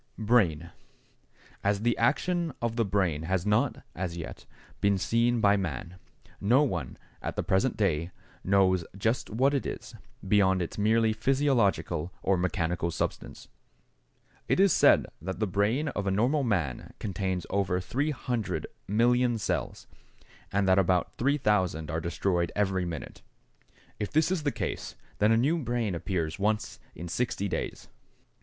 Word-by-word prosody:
=Brain.= 95 -8 +2 0.9
As 100 0 +1
the 120 +1 +2
action 165 +6 +1
of 120 -1 -2
the 115 - +2
brain 95 -7 0
has 90 +2 -1
not, 105 0 +1
as 85 -1 -4
yet, 85 - -8 0.3
been 100 -1 +2
seen 115 +4 +1
by 105 -1 +4
man, 90 0 -4 0.4
no 125 +8 +4
one, 85 - -3 0.2
at - - -4
the - - -1
present 95 +7 +1
day, 85 -5 +1 0.3
knows 95 -2 +3
just 115 +5 0
what 130 +6 +2
it 140 - 0
is, - - -6 0.3
beyond 95 -2 +4
its 85 +3 -4
merely 110 +1 +3
physiological 110 - +1
or 95 - +3
mechanical 85 -1 -1
substance. 85 - -4 1.0
It - - +2
is 195 -4 +5
said - - +5 0.2
that 95 +2 -5
the 110 - +2
brain 105 - +1
of 100 -7 -3
the - - +1
normal 120 +10 +2
man 90 - -2
contains 95 -2 -3
over 95 -2 +1
300,000,000 120 -1 0
cells, - - -3 0.7
and 100 0 +1
that 95 +1 +5
about 90 -1 +2
3,000 105 - +1
are 80 0 -2
destroyed 85 +1 0
every 95 -3 +1
minute. 80 -4 -7 0.8
If 105 - -2
this 155 +3 +2
is 185 -4 0
the 145 -1 0
case, - - -4 0.2
then 105 +2 +4
a 115 - +5
new 150 +8 +2
brain 120 - -1
appears 85 -2 -2
once 105 +2 -1 0.2
in 85 - -7
60 100 +2 -1
days. - - -4
100 Hz, 145 wpm, -28 LUFS, 90-120 Hz, 1.0 s, is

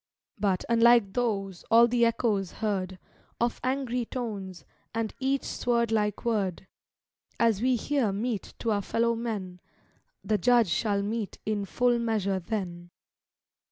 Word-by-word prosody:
But, 195 -3 0
unlike 235 -3 +5
those, 195 -6 -2
all 230 +1 +7
the 235 0 +3
echoes 215 -5 0
heard, 190 -4 -2 0.4
Of 235 0 0
angry 255 -2 -1
tones, 200 -7 -5 0.3
and 225 -1 -1
each 270 +1 0
sword 235 -2 0
like 210 0 0
word; 200 -6 -1 0.7
As 225 -3 +3
we 255 +1 +3
here 245 -2 0
mete 215 +1 -3
to 230 - -1
our 205 -1 +1
fellow 235 +3 +1
men, 210 -6 -4 0.6
The 215 -1 +1
Judge 235 +1 +4
shall 200 +6 0
mete 215 0 -3
in 210 -2 -1
full 245 +4 +1
measure 210 -5 0
then. 175 -2 -5
220 Hz, 135 wpm, -28 LUFS, 195-235 Hz, 0.7 s, all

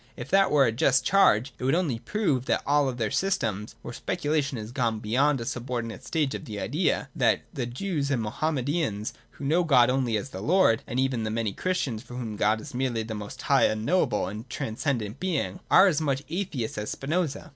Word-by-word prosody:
If - - -7
that 195 0 +5
were 145 -2 +5
a 115 - +2
just 125 +2 +2
charge, 135 - +4
it - - -7
would 135 +4 +3
only 155 -10 0
prove 150 - -1
that - - 0
all 145 -1 +3
other 120 -4 -2
systems, 110 - -1
where - - -7
speculation 145 -3 -1
has 110 -1 -6
not - - -12
gone 120 -5 0
beyond 130 +6 +2
a 115 - -4
subordinate 120 -2 -4
stage 150 -4 -1
of - - -6
the 105 -2 -6
idea, 150 - 0
— - - -37
that 115 -5 +2
the 130 -6 -3
Jews 140 +3 -2
and 130 -5 0
Moham 155 +9 -1
medans 130 -6 -1 0.2
who 140 - -8
know 165 +5 +3
God 125 -6 +5
only 125 -4 +1
as 105 - -5
the 95 - -6
Lord, 155 - +3
— - - -37
and 120 - -4
that 130 - +3
even 130 -3 -1
the 110 - -2
many 110 -2 -1
Christians 140 - -2
for 125 - -11
whom 115 -4 -4
God 105 +2 +2
is - - -10
merely 125 -3 -1
the 110 0 -6
most 105 -1 -7
high, - - +4
unknowable, 115 - +1
and 105 +6 -7
transcendent 115 0 -3
being, 180 -1 -2
are 185 - +7
as 165 -5 +2
much 140 -2 0
atheists 165 - -3
as 105 - -4
Spinoza. 155 +1 -2
130 Hz, 220 wpm, -27 LUFS, 110-150 Hz, 0.2 s, are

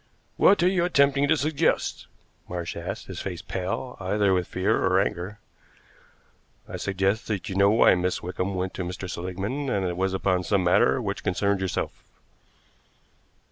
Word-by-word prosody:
"What 200 -3 +5
are - - +5
you 185 -2 +2
attempting 140 -4 +3
to 160 +2 +3
suggest?" 155 +2 0 0.4
Marsh 85 -1 -4
asked, - - -5
his - - -7
face - - -5
pale, 95 +7 -4
either 100 +1 +1
with 90 -1 0
fear - - 0
or - - +3
anger. 90 +4 -2 1.3
"I - - -6
suggest 95 +3 -1
that 105 -4 -3
you 95 - -4
know 100 +1 +5
why 110 +3 +5
Miss 90 0 -1
Wickham 90 +2 -3
went 95 0 -2
to 90 - -4
Mr. 90 +1 -5
Seligmann 95 +11 -4
and 100 -5 0
that - - 0
it 90 - -4
was 95 0 0
upon 95 -1 +1
some 95 +1 +1
matter 90 0 +3
which - - -4
concerned 100 +1 +1
yourself." 95 - -2
95 Hz, 170 wpm, -25 LUFS, 90-120 Hz, 1.3 s, What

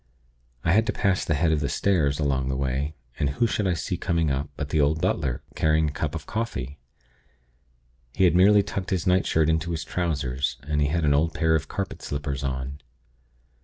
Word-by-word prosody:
I 85 - +2
had 110 +4 +3
to - - 0
pass 95 -2 +1
the 80 - 0
head 80 +2 +2
of 80 - +2
the 70 - -1
stairs, 75 -8 +1
along 65 -3 0
the 65 - -1
way, 70 +3 -2 0.2
and 70 - +1
who 70 +12 +1
should 105 -3 0
I 90 - +1
see 85 +3 -3
coming 85 -4 0
up, 70 +2 -2
but 70 -1 -4
the 80 - +2
old 75 +2 +2
butler, 75 -8 -1
carrying 80 0 +2
a - - -8
cup 75 0 -3
of 80 - -6
coffee. 75 - -4 1.4
He - - +2
had 90 -3 +5
merely 100 +3 +6
tucked 95 -1 -4
his 90 -3 -1
nightshirt 90 -4 +3
into 80 +1 0
his 80 -2 -2
trousers, 70 -8 -2
and 75 0 -1
he 70 - +3
had 80 +2 0
an 70 - +4
old 80 +3 +1
pair 80 -1 +2
of 80 -1 0
carpet 100 +3 -4
slippers 70 -1 -4
on. 65 +2 -4
80 Hz, 205 wpm, -25 LUFS, 70-85 Hz, 1.4 s, merely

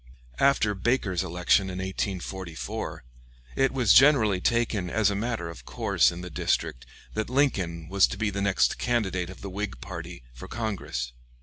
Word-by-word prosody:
After 135 -7 +3
Baker's 100 -3 0
election 90 +2 +2
in 90 - -5
1844, 95 -2 -4 0.5
it 135 - +3
was 125 -7 +4
generally 120 -9 +5
taken 115 -6 +1
as 105 +1 +2
a - - -2
matter 110 -4 -2
of 85 - -9
course - - +2
in 85 +1 -7
the 90 0 -7
district 65 -3 -1 0.3
that 110 +1 -2
Lincoln 95 - 0
was 95 +1 +4
to - - -6
be 110 0 0
the 100 0 -3
next 100 -1 +2
candidate 95 -7 0
of 95 - -11
the 100 - -6
Whig 105 +1 -4
party 85 -4 -8
for - - -10
Congress. 95 - -4
95 Hz, 165 wpm, -27 LUFS, 90-110 Hz, 0.5 s, generally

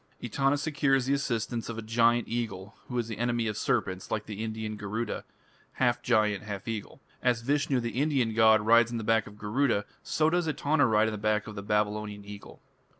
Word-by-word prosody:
Etana 135 +4 +1
secures 140 -3 +1
the 135 - +1
assistance 120 -4 -2
or 115 - -5
a - - -3
giant 115 +1 +2
eagle 110 -4 -4
who 125 - -4
is 115 -1 -2
an 110 - -5
enemy 120 0 0
of 105 -1 -2
serpents 95 -2 -1
like 105 - -2
the 105 0 -5
Indian 110 -1 -4
Garuda, 105 +2 -4 0.5
half 125 -2 +1
giant, 105 -4 +2
half 100 -1 -7
eagle. 110 -3 -5 0.2
As 120 -2 +1
Vishnu, 140 0 +1
the 120 -1 -3
Indian 135 -7 +1
god, 110 -1 +5
rides 115 +2 +5
on 120 - -3
the 110 - -4
back 115 -1 +2
of 105 0 -12
Garuda, 105 +1 0 0.2
so 155 0 +1
does 175 -1 +1
Etana 150 -2 +2
ride 110 -1 +3
on - - -1
the 105 - -5
back 105 0 +1
of 110 - -8
the 100 - -6
Babylonian 105 0 -1
Eagle. 100 0 -11
115 Hz, 205 wpm, -29 LUFS, 105-125 Hz, 0.5 s, god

